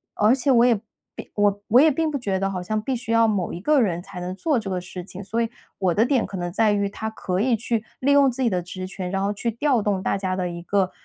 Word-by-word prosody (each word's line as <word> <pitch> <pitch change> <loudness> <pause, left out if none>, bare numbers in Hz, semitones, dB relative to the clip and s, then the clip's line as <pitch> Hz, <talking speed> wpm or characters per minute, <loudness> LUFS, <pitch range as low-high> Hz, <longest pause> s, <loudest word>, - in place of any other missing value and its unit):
而 215 +3 +4
且 270 +1 +1
我 240 -1 +6
也 245 - +5 0.4
并 - - -9
我 205 -1 +2
我 240 - +6
也 310 +3 +6
并 320 +3 0
不 295 - -2
觉 200 -7 -2
得 195 0 0
好 185 -2 -4
像 215 +4 -1
必 260 +4 -2
须 235 -1 -5
要 230 0 +5
某 200 -5 -1
一 - - -5
个 300 +7 +3
人 180 -8 +1
才 195 0 -9
能 180 +1 -4
做 300 - 0
这 220 -3 -4
个 185 -2 -2
事 180 0 -8
情。 190 +2 -9
所 210 +4 -2
以 230 0 0 0.3
我 185 -3 +1
的 210 - +3
点 250 -1 +2
可 - - -8
能 175 -1 -3
在 215 +3 +3
于 200 -1 +1
他 220 +2 -5
可 185 -3 -2
以 240 0 +3
去 225 0 -2 0.2
利 275 +2 +2
用 280 -2 +5
自 265 - -5
己 245 - +3
的 180 -3 -1
职 185 +1 -6
权， 185 -1 -5
然 195 0 -1
后 200 - +1
去 230 +3 -2
调 245 -1 +1
动 200 -2 0
大 - - 0
家 190 -1 -2
的 180 -1 -2
一 170 0 -6
个， 190 0 +1
205 Hz, 315 characters per minute, -23 LUFS, 185-240 Hz, 0.4 s, 我